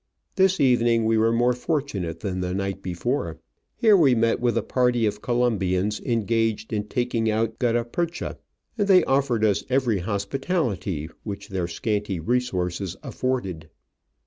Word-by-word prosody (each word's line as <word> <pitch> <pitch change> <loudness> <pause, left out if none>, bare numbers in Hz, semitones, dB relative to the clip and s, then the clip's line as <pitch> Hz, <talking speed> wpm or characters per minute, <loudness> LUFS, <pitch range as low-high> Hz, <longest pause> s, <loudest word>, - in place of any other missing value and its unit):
This 190 -1 +3
evening 120 -3 +3
we 110 0 +3
were 110 +1 +3
more 120 +2 +3
fortunate 120 - -3
than 95 -3 -3
the 90 0 -2
night 95 0 -3
before. 90 - -2 0.4
Here 220 -3 +5
we 145 -9 +5
met 115 0 +2
with 120 -2 +1
a 115 - +1
party 125 -1 +1
of 105 0 -2
Colom 120 -3 +1
bians 95 +2 0
engaged 115 -1 0
in 105 -1 -1
taking 120 -1 0
out 110 +1 -1
gutta 120 -1 +1
percha, 170 +7 -3 0.4
and 205 - +2
they 185 -3 +6
offered 135 -6 +1
us 100 -3 +1
every 125 -6 +2
hospitality 100 - -2
which 100 -1 -7
their 95 -3 -2
scanty 100 +1 -2
resources 95 -3 -1
afforded. 95 -12 -3
115 Hz, 150 wpm, -24 LUFS, 100-125 Hz, 0.4 s, they